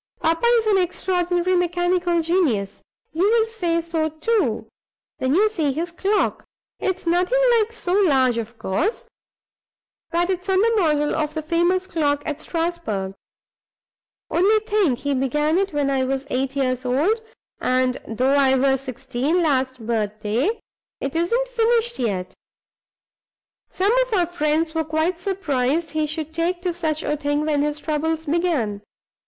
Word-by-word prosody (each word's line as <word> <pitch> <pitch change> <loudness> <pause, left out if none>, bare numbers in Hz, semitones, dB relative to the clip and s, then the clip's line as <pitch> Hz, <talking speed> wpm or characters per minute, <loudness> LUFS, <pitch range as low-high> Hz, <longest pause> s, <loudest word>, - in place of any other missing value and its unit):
Papa 330 +8 +1
is 450 - 0
an 410 -3 +3
extraordinary 360 0 0
mechanical 350 -1 +1
genius. 310 - 0 0.3
You 325 - -2
will 450 0 +3
say 350 -7 -1
so, 325 -1 -1
too, 405 +9 0 0.5
when 260 +3 +1
you 420 +4 +5
see 325 -10 0
his 335 +5 -3
clock. 395 +4 0 0.4
It's 375 -2 -2
nothing 360 +8 +2 0.2
like 435 +1 0
so 365 -6 -3
large, 265 - +3
of 230 +1 -7
course, 320 - -1 1.0
but 345 +2 +1
it's 370 +1 -4
on 380 0 +3
the 460 +3 +3
model 300 -7 +2
of 305 0 -2
the 315 - -3
famous 345 +4 +1
clock 290 -5 0
at 300 -1 -4
Strasbourg. 325 - -3 1.2
Only 405 +6 +4
think, 410 - +2
he 285 +2 -2
began 295 +5 +1
it 390 0 -1
when 290 -2 0
I 265 -1 +1
was 270 +1 -2
eight 265 +2 -1
years 255 -2 0
old; 300 - +1 0.4
and 255 0 +1
(though 255 +5 +1
I 270 -2 +4
was 265 0 +2
sixteen 270 +5 -1
last 260 -5 0
birthday) 215 - -1 0.5
it 275 +3 -4
isn't 465 +10 +1
finished 475 -1 +1
yet! 195 -7 -2 1.4
Some 390 +3 +1 0.2
of 480 - -6
our 360 -3 +3
friends 315 -1 0
were 320 -1 0
quite 315 +3 -1
surprised 325 -5 -1
he 310 -1 0
should 310 +1 -4
take 340 +2 0
to 360 -2 0
such 315 -3 -1
a 295 - 0
thing 290 0 -1
when 295 -2 +1
his 295 0 -1
troubles 320 +1 -2
began. 295 - 0
320 Hz, 150 wpm, -22 LUFS, 270-360 Hz, 1.4 s, you